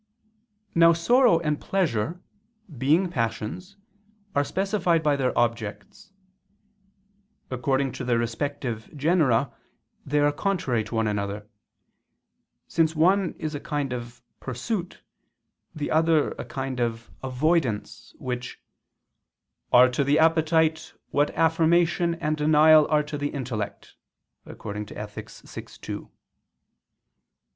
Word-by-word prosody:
Now 165 0 +6
sorrow 235 +3 +4
and 150 -2 -1
pleasure, 170 - -1 0.5
being 150 +9 +2
passions, 120 - -3 0.6
are 145 - +2
specified 190 -2 0
by 150 -2 +3
their 130 -2 0
objects. 120 - -2 1.4
According 135 +1 0
to 130 +1 -6
their 120 -2 +1
respective 120 0 -3
genera, 145 -5 +2 0.5
they 145 +1 -1
are 145 0 +4
contrary 145 - -1
to 110 - -6
one 110 0 +1
another: 105 0 -3 1.2
since 160 0 +1
one 185 +3 +3
is 155 0 -4
a 145 - -4
kind 145 -3 -3
of 120 0 -7 0.2
pursuit, 170 - -4 0.7
the 150 -1 -3
other 160 -1 +3
a - - -7
kind 135 -1 -4
of 115 -1 -3
avoidance, 130 -3 -1
which 125 -1 -5 1.1
"are 125 +1 +8
to 125 +3 0
the 140 +2 +2
appetite, 160 0 +2 0.2
what 145 +1 +2
affirmation 170 +1 +3
and 155 -2 -2
denial 155 0 +6
are 150 0 +2
to 150 0 -6
the 145 0 -1
intellect" 120 -8 -5 0.5
(Ethic. 105 0 -7
vi, - - -10
2). - - -8
145 Hz, 110 wpm, -25 LUFS, 125-165 Hz, 1.4 s, are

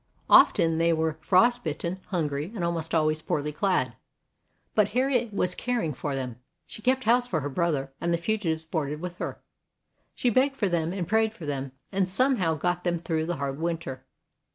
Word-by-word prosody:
Often 165 -1 +6
they 165 0 +3
were 160 -1 -1
frost 235 +9 +4
bitten, 170 +4 -3
hungry, 155 -2 -2
and 185 - -3
almost 165 -1 -1
always 155 -1 +2
poorly 150 -1 -1
clad. 150 - +1 0.8
But 210 -2 +4
Harriet 250 -3 +2
was 180 -3 0
caring 235 -11 -1
for 140 +2 -3
them. 125 -3 -4 0.3
She - - -8
kept 260 +3 +2
house 245 +2 +3
for 160 -9 -1
her 145 - -3
brother, 140 -3 -1
and 170 - 0
the 170 - +2
fugitives 170 -4 -1
boarded 150 -2 -2
with 180 +1 -6
her. - - -5 0.7
She 245 - +1
begged 270 +4 +3
for 210 - 0
them 170 -1 0
and 180 -3 -3
prayed 220 0 +2
for 170 - -8
them, 135 -2 -3 0.2
and 190 -1 +1
some 255 +7 +2
how 165 -5 +1
got 175 +3 -1
them 175 -1 +1
through 160 -1 -2
the 175 - -1
hard 140 0 -3
winter. 165 -6 -3
170 Hz, 190 wpm, -27 LUFS, 155-200 Hz, 0.8 s, Often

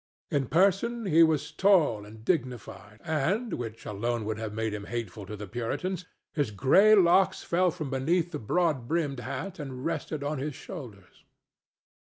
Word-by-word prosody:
In 140 -3 +1
person 200 - +2
he 165 -3 +5
was 160 -3 +3
tall 165 - +3
and 110 +1 -13
dignified, 120 - -3
and, 175 - 0
which 115 -2 -5
alone 115 +2 -2
would 110 0 -3
have 110 -2 -4
made 110 0 -2
him 105 -1 -5
hateful 110 -4 -5
to 105 - -6
the 105 - -6
Puritans, 145 - -3 0.3
his 145 -6 0
gray 185 - +5
locks 190 0 +4
fell 180 +2 +2
from 155 -5 -5
beneath 165 +6 +1
the 150 - -4
broad 150 +1 0
brimmed 150 -5 -1
hat 140 +10 -5
and 135 -2 -6
rested 155 -2 -3
on 145 0 -2
his 145 0 -3
shoulders. 120 - -10
140 Hz, 165 wpm, -28 LUFS, 115-170 Hz, 0.3 s, he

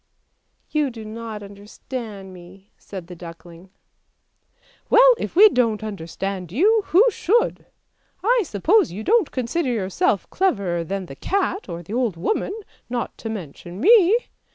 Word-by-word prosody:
" - - -49
' - - -44
You 300 -3 +1
do 225 -3 -9
not 220 -1 -7
understand 200 0 -8
me," 185 +2 -15
said 190 -4 -9
the 180 +1 -10
duckling. 170 +1 -12 0.6
" - - -36
Well, - - +7
if - - -5
we 415 +5 +9
don't 230 - +1
understand 190 -2 -5
you, 420 - +3
who 380 +8 +5
should? 435 +4 0 0.6
I 480 +3 +3
suppose 335 - +2
you 205 +5 -6
don't 445 - +3
consider 260 +4 -2
yourself 195 -3 0
cleverer 200 - 0
than 195 +3 -4
the 135 - -10
cat 390 - -2
or 170 +1 -6
the 195 - -8
old 235 -7 0
woman, 415 - -2 0.3
not 240 -1 -3
to 225 - -5
mention 175 -2 -8
me. 415 - +6
220 Hz, 155 wpm, -22 LUFS, -, 0.6 s, we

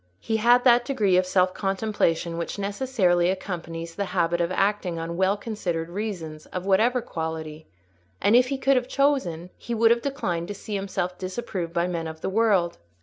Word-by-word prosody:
He 220 - -1
had 240 +3 +5
that 240 -1 +6
degree 215 -8 +1
of 185 0 +3
self 185 -1 +2
contemplation 190 -4 -1
which 170 - -4
necessarily 200 -4 +1
accompanies 170 -3 -4
the 200 +3 -2
habit 170 0 +2
of 170 +1 0
acting 195 -2 0
on 165 +1 -4
well 190 +3 +2
considered 180 -7 -3
reasons, 175 -6 -5
of 185 0 -5
whatever 225 +6 +3
quality; 160 -4 -5 0.5
and 210 - +4
if 250 +1 +5
he 275 +1 -2
could 270 0 +3
have 250 0 -1
chosen, 220 - 0
he 235 - -4
would 225 0 +5
have 235 0 +3
declined 180 -12 -2
to 205 - -5
see 210 - -8
himself 190 -2 -3
disapproved 185 -3 -4
by 170 0 +1
men 170 -2 -3
of 160 0 -8
the - - -2
world. 200 -5 +2
190 Hz, 185 wpm, -25 LUFS, 170-225 Hz, 0.5 s, that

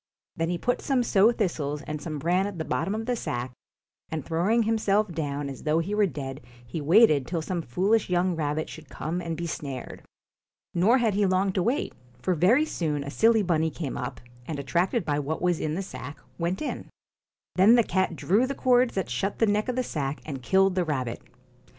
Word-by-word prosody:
Then 165 0 -1
he 175 - 0
put 245 +7 -1
some 265 -3 +1
sow 215 0 +4
thistles 155 -10 -2
and 150 -1 -5
some 155 -1 -4
bran 175 +6 +1
at 200 -3 -6
the 160 - -3
bottom 195 - -1
of 225 +1 -3
the 250 0 0
sack, 125 - -3 0.6
and 155 -4 -4
throwing" 190 +8 +2
himself 215 -2 +1
down 145 -3 -3
as 135 -2 -7
though 155 +1 +1
he 170 +5 -1
were 210 -1 +3
dead, 135 -5 -6 0.2
he 120 +7 -5
waited 155 - +5
till 165 -2 -2
some 175 +1 -2
foolish 190 - +1
young 180 0 +1
rabbit 155 0 -1
should 160 -3 -11
come 170 +4 -3
and 165 -2 -4
be 170 - -3
snared. 140 -5 -6 0.7
Nor 205 +9 +4
had 230 -4 +2
he 200 0 +2
long 185 +1 +2
to 185 - +1
wait, 245 - 0 0.3
for 180 +9 0
very 205 - +4
soon 150 - -2
a 140 - -6
silly 225 +4 +4
bunny 160 -3 +1
came 155 -3 -5
up, 125 +1 -5 0.3
and 155 - -3
attracted 170 +6 0
by 145 -1 0
what 150 +2 -2
was 175 -2 +1
in 155 0 -2
the 195 - -2
sack, 145 -6 -8 0.2
went 175 - -1
in. - - -5 0.7
Then 200 +6 +7
the 235 - +5
cat 190 -3 0
drew 210 +10 +2
the 275 - -3
cords 250 -2 +3
that 190 -3 -1
shut 190 +12 -2
the 225 - +3
neck 210 +3 +1
of 250 - -1
the 255 - 0
sack 145 - -3
and 140 -4 -5
killed 190 +7 +3
the 185 -1 +1
rabbit. 130 -7 -3
175 Hz, 210 wpm, -26 LUFS, 150-205 Hz, 0.7 s, Then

